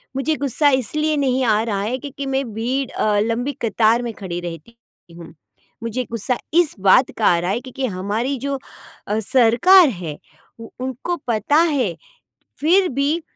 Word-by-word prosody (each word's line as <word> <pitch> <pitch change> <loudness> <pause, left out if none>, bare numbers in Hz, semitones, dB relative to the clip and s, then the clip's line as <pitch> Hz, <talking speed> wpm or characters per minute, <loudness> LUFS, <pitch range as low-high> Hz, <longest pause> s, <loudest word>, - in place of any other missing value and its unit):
मुझे 290 +4 0
गुस्सा 285 +2 +2
इसलिए 305 +5 -1
नहीं 260 -2 +1
आ 215 -2 +3
रहा 205 -4 -2
है 230 +5 -2
क्योंकि 280 0 -7
मैं 270 0 0
भीड़ 250 +5 -2
अ, 210 -1 +1
लंबी 230 +5 -1
कतार 230 +1 +2
में 235 -1 -4
खड़ी 185 -4 -6
रहती 175 +6 -8 0.4
हूँ, 170 -1 -12 0.5
मुझे 230 +2 -2
गुस्सा 235 +2 -1 0.2
इस 340 -2 +3
बात 195 +7 +4
का 220 - 0
आ 170 - +4
रहा 175 +2 -1
है 220 - -1
क्योंकि 265 0 -5
हमारी 215 +6 -2
जो 280 +2 -2 0.5
अ, 210 +1 0
सरकार 255 - +5
है, 175 - -6 0.4
उ 230 - -9 0.2
उनको 260 +7 -3
पता 230 +5 0 0.2
है, 245 - 0 0.6
फिर 360 +5 +3
भी 285 +5 0
240 Hz, 165 wpm, -20 LUFS, 210-275 Hz, 0.6 s, सरकार